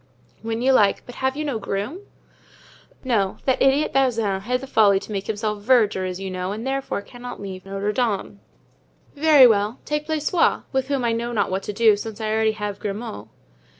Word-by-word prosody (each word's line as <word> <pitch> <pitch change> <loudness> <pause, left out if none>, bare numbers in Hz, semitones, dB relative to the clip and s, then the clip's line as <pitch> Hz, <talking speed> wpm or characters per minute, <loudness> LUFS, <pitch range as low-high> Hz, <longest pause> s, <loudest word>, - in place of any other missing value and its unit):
"When 225 +2 -3
you 265 +1 +4
like; 205 -5 +3
but 245 - -10
have 265 +1 0
you 305 - -2
no 270 -6 -2
groom?" 205 - -4 1.0
"No; 215 -7 0
that 260 - +1
idiot 270 +3 +3
Bazin 230 -7 +1
had 250 +5 -1
the 270 - -7
folly 210 -6 +4
to 215 - -10
make 195 -1 -4
himself 210 -1 -2
verger, 210 -5 +3
as 185 0 -4
you 195 -1 -5
know, 185 +1 -3
and 220 +4 -5
therefore 270 -6 -2
cannot 245 +1 -9
leave 190 -1 -8
Notre 195 +1 -2
Dame. 210 -4 -2 0.8
"Very 295 -2 +7
well, 215 0 +2
take 300 0 -2
Blaisois, 315 +2 +1
with 265 -1 0
whom 275 -3 -1
I 235 - +2
know 235 +1 -2
not 215 - 0
what 190 +1 -1
to - - +1
do, 220 0 +5
since 215 +1 -7
I 215 -1 -2
already 220 0 +2
have 210 -2 -5
Grimaud." 200 - -5
220 Hz, 195 wpm, -23 LUFS, 200-260 Hz, 1.0 s, Very